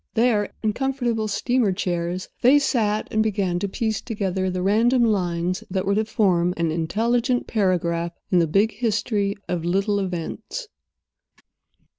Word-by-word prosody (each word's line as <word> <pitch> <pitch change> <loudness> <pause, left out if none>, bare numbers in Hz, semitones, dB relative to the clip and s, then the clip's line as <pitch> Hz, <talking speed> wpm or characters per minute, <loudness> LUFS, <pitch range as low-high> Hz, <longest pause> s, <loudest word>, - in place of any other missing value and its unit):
There, 220 -3 +2
in 215 -1 +1
comfortable 245 -4 -1
steamer 230 +1 +1
chairs, 180 -1 -2
they 260 +4 +6
sat 215 -7 +1
and 220 - +2
began 195 -5 0
to 200 - -2
piece 220 +1 -2
together 190 -4 -2
the 180 0 -2
random 235 +5 +3
lines 180 -4 0
that 190 0 -1
were 200 - +2
to 215 +2 +1
form 180 -5 +1
an 165 -1 0
intelligent 235 - 0
paragraph 170 -4 0 0.2
in 180 - +5
the 165 - +2
big 200 +7 +2
history 210 -2 -1
of 175 -2 -2
little 195 +4 +1
events. 190 - -5
200 Hz, 145 wpm, -23 LUFS, 180-225 Hz, 0.2 s, they